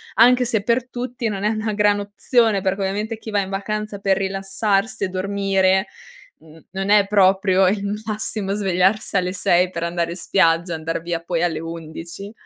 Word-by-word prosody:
Anche 250 +1 +5
se 225 -3 0
per 235 +4 0
tutti 245 -1 -4
non 200 -2 -3
è 210 - +2
una 215 0 -2
gran 205 0 +2
opzione, 210 +1 +1
perché 195 +1 -1
ovviamente 210 +4 -2
chi 220 0 -9
va 205 - +1
in 190 -1 -2
vacanza 210 +1 -4
per 195 -1 +1
rilassarsi 195 +2 -1
e - - -2
dormire, 190 0 +1 0.5
mhmm, 160 0 -18
non 195 +1 -2
è 205 -1 +5
proprio 190 -1 +4
il 200 +2 0 0.2
massimo 210 -2 -3
svegliarsi 195 +1 +1
alle 180 -1 0
6 180 -1 +2
per 170 - -5
andare 170 0 -1
in 175 - -6
spiaggia, 170 -1 +1
andar 160 +1 -3
via 170 0 -3
poi 170 0 -2
alle 170 -3 0
11. 165 +4 -8
195 Hz, 180 wpm, -21 LUFS, 180-210 Hz, 0.5 s, Anche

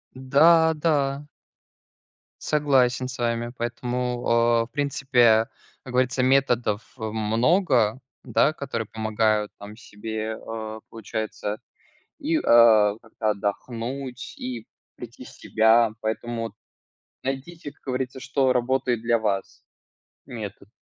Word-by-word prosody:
Да 160 +5 +5
да. 145 -3 0 1.2
Согласен 130 -4 +2
с 130 +1 -8
вами. 120 0 -1
Поэтому, 120 +1 -3
а, 115 0 +3
в 115 - -20
принципе, 130 -6 +3 0.4
как 125 - -9
говорится, 125 0 +1
методов, 125 -5 +2 0.2
э, - - -6
много, 115 - +2 0.2
да, 145 - +2
которые 115 -8 -4
помогают 110 -1 0
там 105 +1 -10
себе. 110 0 -5
Э, 110 -1 -6
получается, 110 -1 -5 0.6
и, 315 +2 0
а, 110 - +5
как-то 110 -1 -3
отдохнуть 120 +5 -4
и 120 -3 -6 0.3
прийти 120 +1 -10
в - - -12
себя. 110 +1 +3
Поэтому 115 +2 -3
вот 115 - -6 0.7
найдите, 140 +4 -5
как - - -31
говорится, 130 0 -3
что 130 0 +1
работает 125 -1 0
для 115 0 +2
вас, 100 -3 -3 0.6
метод. 105 -3 -8
120 Hz, 110 wpm, -24 LUFS, 110-130 Hz, 1.2 s, Да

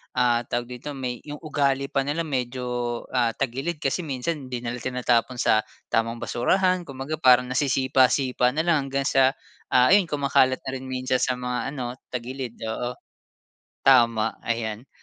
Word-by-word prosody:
ah, 120 -1 +2
tawag 120 +1 -3
dito 145 +3 -6
may 125 -2 -4
yung 145 - -5
ugali 140 -3 0
pa 135 0 0
nila 155 +3 -1
medyo, 125 -4 -3
ah, 120 -3 +1
tagilid 135 +5 -3
kasi 135 +6 0
minsan 145 -2 -3
hindi 125 -1 -5
na 120 - -2
nila 125 - -5
tinatapon 125 0 0
sa 110 -2 +3 0.3
tamang 115 0 0
basurahan, 185 +8 +1
kung 135 - -9
baga 140 +4 -4
parang 125 -2 +5
nasisipa-sipa 130 -1 +2
na 160 - +1
lang 160 -5 +2
hanggang 135 0 -1
sa 135 0 +3 0.3
ayun 175 +10 +5
kumakalat 140 -3 +2
na 130 - -4
rin 130 0 -6
minsan 130 0 -1
sa 130 - +1
mga 125 +3 -3
ano 125 -1 -5
tagilid, 125 0 -5
oo 120 +3 -3 0.9
tama, 115 -4 +5
ayan 115 +1 -3
130 Hz, 160 wpm, -25 LUFS, 120-140 Hz, 0.9 s, parang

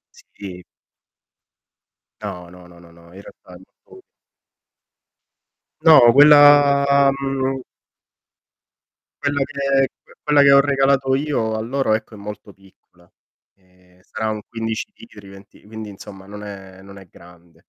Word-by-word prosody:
Sì. 90 -3 -12 1.6
No, 90 -1 -8
no, 90 0 -16
no, 85 0 -18
no, 85 -1 -19
no, 85 0 -20
in 95 - -13
realtà 90 - -17
è - - -12 0.3
molto 380 - -17 1.8
No, 155 -8 +6
quella 140 -1 +5
mhmm 135 -1 -4 1.6
quello 145 -1 -1
che 145 0 -14 0.3
c - - -29
quella 150 -1 +2
che 140 0 +5
ho 140 - +6
regalato 135 -1 +1
io 135 -7 -2
a 110 - -4
loro, 130 -1 -2
ecco, 110 0 -4
è - - -13
molto 105 0 -10
piccola. 90 -2 -26 0.5
Ehm, 90 -1 -29
sarà 110 +3 -5
un 110 -1 -5
15 115 - -6
litri, 105 -4 -16
venti 95 0 -17
quindi, 110 0 -10
insomma, 95 -1 -13
non 105 +1 -11
è 95 -2 -12
non 100 0 -15
è 95 -2 -15
grande. 85 -1 -20
110 Hz, 135 wpm, -19 LUFS, 95-140 Hz, 1.8 s, No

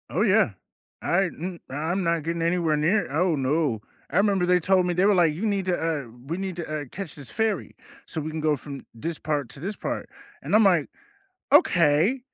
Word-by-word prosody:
Oh, - - -1
yeah. - - +4 0.5
I 185 +3 +2
m 175 0 -6
I'm 160 +7 -2
not 170 -2 0
getting 165 +1 -2
anywhere 170 -2 +1
near 170 +4 +1
oh, 170 +3 +2
no, 135 -4 0 0.3
I - - +4
'member 200 -3 +2
they 180 0 +4
told 185 +1 +3
me 180 - 0
they 180 +3 +2
were 205 - +4
like, 170 -4 +4
"You 180 +9 -3
need 200 -3 0
to, 180 -1 +1
uh 160 -4 -1 0.2
we 165 +4 -2
need 190 -2 -4
to, 155 -3 -3
uh, - - -6
catch 195 -5 -6
this 140 -4 -10
ferry, 220 -3 -1 0.3
so 160 - -4
we 155 - -4
can 160 0 -4
go 155 -1 +2
from 140 0 -9
this 160 +8 -4
part 145 -5 -2
to - - -11
this 195 +8 -4
part," - - -4 0.3
and - - -4
I'm 220 - +6
like, 175 -7 +3 0.6
"Okay, 175 - +4
170 Hz, 215 wpm, -25 LUFS, 150-190 Hz, 0.6 s, I'm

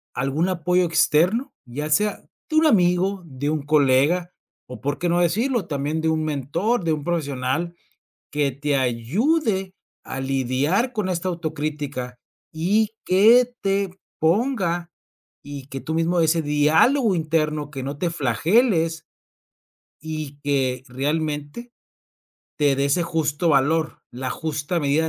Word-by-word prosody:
algún 135 +7 0
apoyo 180 0 +1
externo? 175 - +2
Ya 145 +5 -5
sea, 210 +7 +1 0.3
de 310 - -3
un 315 +1 +5
amigo, 190 - +3
de 140 0 -3
un 155 -1 -1
colega 150 +4 +2 0.3
o, 125 - -9
¿por 145 +1 -2
qué 175 - -1
no 175 +1 +2
decirlo?, 215 +4 +1
también 145 +2 -2
de 160 - +1
un 160 0 0
mentor, 160 - -1
de 165 - 0
un 150 -2 -4
profesional 150 0 -2 0.6
que 145 -1 +1
te 140 +2 -1
ayude 190 - 0 0.3
a 135 - -4
lidiar 135 - 0
con 210 -3 -1
esta 180 +1 -2
autocrítica 150 -6 -4 0.3
y 205 +7 +1
que 230 +7 +5
te 195 -1 0 0.3
ponga 175 -2 0 0.5
y 140 -2 -8
que 135 -1 -6
tú 160 - -4
mismo 165 +2 +1
ese 165 0 +3
diálogo 160 - +3
interno, 155 -3 -1
que 135 -3 -6
no 140 +2 -5
te 175 - 0
flageles 165 - +1 0.9
y 155 -2 -6
que 130 -3 0
realmente 150 - -3 0.9
te 145 -3 +3
dé 140 - +1
ese 155 +5 +2
justo 165 -1 -1
valor, 155 +3 +1
la 130 +1 -5
justa 155 +3 -2
medida 145 +2 +1
160 Hz, 135 wpm, -23 LUFS, 145-180 Hz, 0.9 s, un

